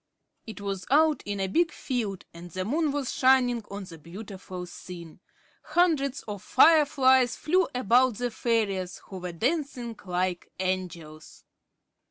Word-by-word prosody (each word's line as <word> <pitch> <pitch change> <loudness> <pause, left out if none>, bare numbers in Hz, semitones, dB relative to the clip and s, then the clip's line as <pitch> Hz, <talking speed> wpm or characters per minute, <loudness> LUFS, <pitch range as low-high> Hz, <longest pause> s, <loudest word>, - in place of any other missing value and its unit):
It 220 - -8
was 195 -2 -4
out 310 +2 +4
in 205 -1 -3
a 195 - +1
big 325 - +1
field, 220 -8 -3
and 170 +1 -10
the 185 +2 -4
moon 300 - +1
was 280 -3 -2
shining 250 -3 +3
on 200 0 -6
the 165 -3 -11
beautiful 185 +1 -8
scene. 170 -2 -10 0.4
Hundreds 305 -4 +1
of 205 -3 -6
fireflies 265 -6 +5
flew 360 +3 +2
about 250 +1 +3
the 245 +2 -2
fairies, 205 -6 -1
who 190 - -7
were 180 0 -5
dancing 245 - -2
like 180 0 -1
angels. 175 -4 -4
220 Hz, 140 wpm, -27 LUFS, 185-265 Hz, 0.4 s, fireflies